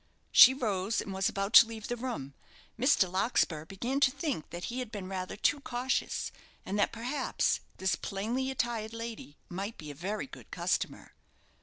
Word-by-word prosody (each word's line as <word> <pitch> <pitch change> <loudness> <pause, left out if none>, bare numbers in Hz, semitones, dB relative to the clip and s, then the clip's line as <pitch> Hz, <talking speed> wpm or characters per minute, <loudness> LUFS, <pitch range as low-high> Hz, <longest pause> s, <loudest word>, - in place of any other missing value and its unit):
She 260 +2 +9
rose, 210 -4 0
and 195 - -4
was 190 0 +1
about 195 +2 -3
to 230 - +10
leave 225 -1 -7
the 240 - -2
room. 195 - -5 0.4
Mr. 245 -5 +4
Larkspur 180 -5 +1
began 235 +10 -2
to 280 - +5
think 275 - -3
that 175 +1 -7
he 245 +2 -3
had 250 -4 -5
been 200 -4 -6
rather 185 -1 -4
too 290 - +2
cautious; 255 -1 -2 0.3
and 200 +2 -2
that 205 - +3
perhaps, 245 +5 0 0.2
this 190 0 +1
plainly 235 +7 -2
attired 235 -4 -2
lady 230 -10 -7
might 195 +5 -5
be 150 -2 -8
a - - -8
very 190 +9 -3
good 265 - -13
customer. - - -2
220 Hz, 175 wpm, -31 LUFS, 190-245 Hz, 0.4 s, to